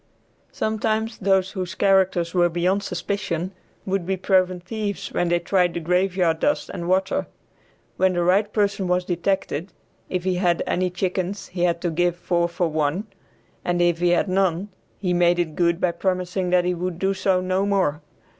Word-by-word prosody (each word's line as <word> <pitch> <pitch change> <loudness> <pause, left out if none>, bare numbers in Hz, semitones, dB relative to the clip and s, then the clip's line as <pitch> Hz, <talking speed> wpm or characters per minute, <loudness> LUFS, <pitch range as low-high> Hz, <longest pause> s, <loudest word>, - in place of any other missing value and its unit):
Sometimes 220 +1 -1
those 190 -1 +2
whose 185 -1 -4
characters 190 -4 +2
were 175 -1 +3
beyond 180 +4 +1
suspicion 180 -2 -3 0.3
would 195 -1 -1
be 190 +2 -1
proven 185 -1 +2
thieves 205 +2 -4
when 175 - +1
they 175 - +3
tried 175 0 +1
the - - -1
graveyard 180 -1 +1
dust 290 - 0
and 175 -2 -4
water. 190 +1 +1 0.7
When 185 0 +3
the 175 -1 0
right 200 +4 +2
person 200 -3 0
was 180 0 +1
detected, 180 -1 -2 0.4
if 185 -1 -2
he 185 -1 0
had 175 -2 +1
any 185 0 0
chickens 185 +2 -3
he 180 -1 0
had 170 -1 0
to 175 - -1
give 175 +1 +1
four 175 -1 0
for 170 0 0
one, 155 +5 -1 0.6
and 175 0 0
if 175 -1 +2
he 175 0 +2
had 175 +3 +2
none 190 0 +1 0.3
he 180 -3 -1
made 175 0 +3
it 165 -3 -1
good 170 -1 +2
by 180 - +2
promising 185 +1 -1
that 180 0 +3
he 180 - +1
would 180 0 -3
do 195 +2 +1
so 190 -1 +1
no 185 +2 0
more. 185 -7 +1
180 Hz, 180 wpm, -23 LUFS, 175-190 Hz, 0.7 s, were